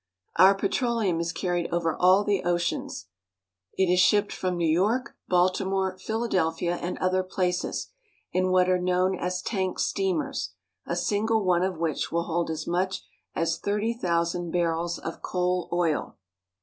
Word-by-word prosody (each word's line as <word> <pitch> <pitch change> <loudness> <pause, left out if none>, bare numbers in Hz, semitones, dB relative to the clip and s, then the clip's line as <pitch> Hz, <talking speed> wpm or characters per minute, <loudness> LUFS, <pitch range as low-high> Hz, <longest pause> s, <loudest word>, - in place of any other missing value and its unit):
Our 195 +1 +7
petroleum 205 -3 0
is 170 0 -1
carried 175 -1 -2
over 170 -2 0
all 185 +3 +5
the 205 -2 0
oceans. 175 0 -1 0.7
It - - +3
is 180 0 +2
shipped 205 +3 +4
from 185 -1 -2
New 170 -1 +1
York, 210 +11 +1
Baltimore, 185 +1 +1
Phila 220 +5 -3
delphia, 175 -2 0
and 175 - -3
other 185 0 +1
places, 185 -1 -2 0.4
in 185 +1 +1
what 185 0 +4
are 185 0 +3
known 185 +1 +2
as 180 0 -3
tank 190 -4 -2
steamers, 180 - -1 0.3
a 170 - -1
single 210 +4 +1
one 180 -1 +3
of 185 -2 -1
which 160 -2 -2
will 170 0 0
hold 170 0 -1
as 160 -1 -3
much 185 +2 -1 0.3
as 165 0 0
thirty 210 +3 0
thousand 170 -4 -1
barrels 170 0 0
of 165 - -7
coal 180 -1 -1
oil. 170 -3 0
180 Hz, 155 wpm, -26 LUFS, 170-190 Hz, 0.7 s, Our